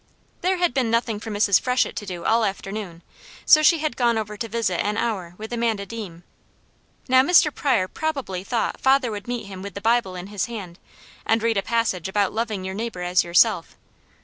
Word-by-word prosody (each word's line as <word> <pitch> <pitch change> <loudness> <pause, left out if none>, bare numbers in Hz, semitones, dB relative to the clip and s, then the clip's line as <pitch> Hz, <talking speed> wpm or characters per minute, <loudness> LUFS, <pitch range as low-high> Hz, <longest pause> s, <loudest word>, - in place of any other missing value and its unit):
There 370 +1 +1
had 355 -1 +1
been 255 -4 +1
nothing 230 -2 0
for 220 - -7
Mrs. 205 -2 +3
Freshett 250 0 +1
to 205 - -5
do 175 -2 -6
all 230 +1 +3
afternoon, 195 -3 -4 0.4
so 310 - +7
she 330 +2 +5
had 310 -5 -2
gone 235 -2 +2
over 210 -1 -4
to 230 +2 -4
visit 215 -6 -1
an 210 +1 -1
hour 190 -8 -2
with 220 +2 -7
Amanda 230 -4 -1
Deam. 195 -7 -8 0.8
Now 260 0 +6
Mr. 305 +1 +4
Pryor 240 -10 +1
probably 275 - -3
thought 230 +3 -2
father 265 -2 +3
would 205 0 -7
meet 240 -3 -3
him 190 -1 -9
with 200 +1 -8
the - - -4
Bible 225 -3 +1
in 180 0 -6
his 200 - -1
hand, 200 -7 -8 0.4
and 225 0 +1
read 230 -2 +1
a - - +2
passage 215 -6 -1
about 200 0 0
loving 215 -4 -2
your 190 - -4
neighbour 215 -3 -4
as 180 0 +2
yourself. 175 +1 +2
220 Hz, 200 wpm, -23 LUFS, 195-240 Hz, 0.8 s, so